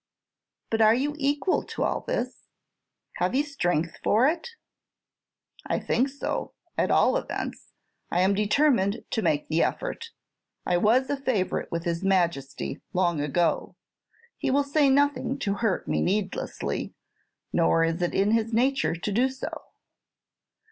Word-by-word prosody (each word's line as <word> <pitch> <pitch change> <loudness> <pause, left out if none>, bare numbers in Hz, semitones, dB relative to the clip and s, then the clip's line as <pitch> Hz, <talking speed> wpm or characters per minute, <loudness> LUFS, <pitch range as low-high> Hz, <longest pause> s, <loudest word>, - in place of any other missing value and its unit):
"But 225 0 +1
are 220 +1 +6
you 285 +4 0
equal 290 +6 +1
to - - -4
all - - 0
this? - - -4 0.7
Have 185 +7 0
you 280 - +3
strength 175 - -1
for 230 +5 +4
it?" 335 +9 -1 1.2
"I - - 0
think 255 +4 +1
so; 280 +1 -4 0.2
at - - +1
all - - +4
events, - - -5 0.4
I 175 - +1
am 190 +2 +3
determined 210 0 +2
to 225 - 0
make 150 -6 0
the 160 +1 +1
effort. - - -2 0.6
I 175 - +2
was 235 +8 +3
a 285 - 0
favorite 255 -9 -1
with 170 0 -2
his 170 +1 -2
Majesty 170 -8 0
long 175 -4 +1
ago. 165 +4 0 0.6
He - - -1
will 280 +2 +3
say 280 0 +3
nothing 270 -1 +2
to 205 -8 -1
hurt 220 -5 0
me - - 0
needlessly; 195 +1 -2 0.6
nor 165 -1 +3
is 165 +2 0
it 175 - -1
in 200 +2 +3
his 225 0 +1
nature 260 -2 +1
to 175 +5 -4
do 245 +6 +2
so. 265 0 -6
220 Hz, 150 wpm, -26 LUFS, 175-275 Hz, 1.2 s, are